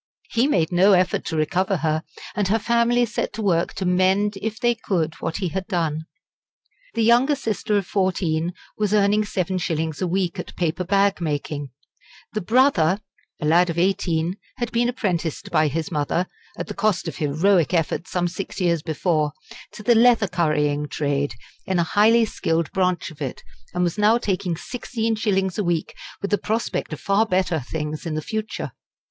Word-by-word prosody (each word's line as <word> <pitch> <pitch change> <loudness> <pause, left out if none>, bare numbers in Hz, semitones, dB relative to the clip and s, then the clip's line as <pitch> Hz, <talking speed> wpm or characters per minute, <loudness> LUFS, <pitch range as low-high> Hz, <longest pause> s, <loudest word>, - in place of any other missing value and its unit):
He 235 +4 +3
made 170 - +1
no 190 +3 +5
effort 180 -1 +2
to 160 - -3
recover 180 +5 +1
her, 155 -1 0 0.3
and 205 -1 +1
her 215 +4 +3
family 235 +2 +2
set 215 - -3
to 220 +1 -4
work 170 -4 +1
to 190 - -3
mend 190 +3 +2
if 220 +1 -3
they 240 0 +3
could 175 -8 -1
what 160 - -2
he 185 -4 -1
had 190 +3 -4
done. 160 -3 -1 0.9
The 230 - +2
younger 245 +6 +4
sister 215 -4 -1
of 200 - -1
fourteen 175 -3 0 0.2
was 210 -1 +1
earning 210 +1 +3
seven 185 -2 -1
shillings 160 -2 -2
a 185 - +1
week 180 -1 -1
at - - -7
paper 175 +1 -1
bag 200 +1 +2
making; 145 -2 -3 0.6
the 215 - -1
brother, 205 - +3 0.4
a 150 - -3
lad 170 +3 +4
of 165 - -3
eighteen, 175 -1 +1 0.2
had 240 -2 -3
been 240 +1 +2
apprenticed 180 - -2
by 155 - +3
his 160 +3 -3
mother, 155 +3 0 0.3
at - - -3
the - - -6
cost 200 -5 0
of 165 - -5
heroic 160 +4 +2
efforts 170 0 0
some 175 -1 0
six 185 +4 -6
years 170 -3 +2
before, 155 -1 0 0.4
to 210 - -9
the 240 - +5
leather 230 -2 +5
currying 150 -4 0
trade, 145 -4 -1 0.3
in 190 - +1
a 170 - +3
highly 220 +6 +4
skilled 165 -6 -1
branch 180 -3 0
of 155 -1 -15
it, 135 -3 -4 0.3
and 180 - +1
was 175 +3 -1
now 215 +3 +5
taking 185 -6 -1
sixteen 230 +1 -3
shillings 195 -3 0
a - - +1
week 170 -3 -1 0.3
with 200 - -2
the 205 - +3
prospect 220 -2 -2
of 155 - -5
far 200 +2 +2
better 185 -6 +1
things 150 +4 -4
in 155 - -2
the 155 - -1
future. 220 +2 -4
185 Hz, 185 wpm, -23 LUFS, 160-210 Hz, 0.9 s, no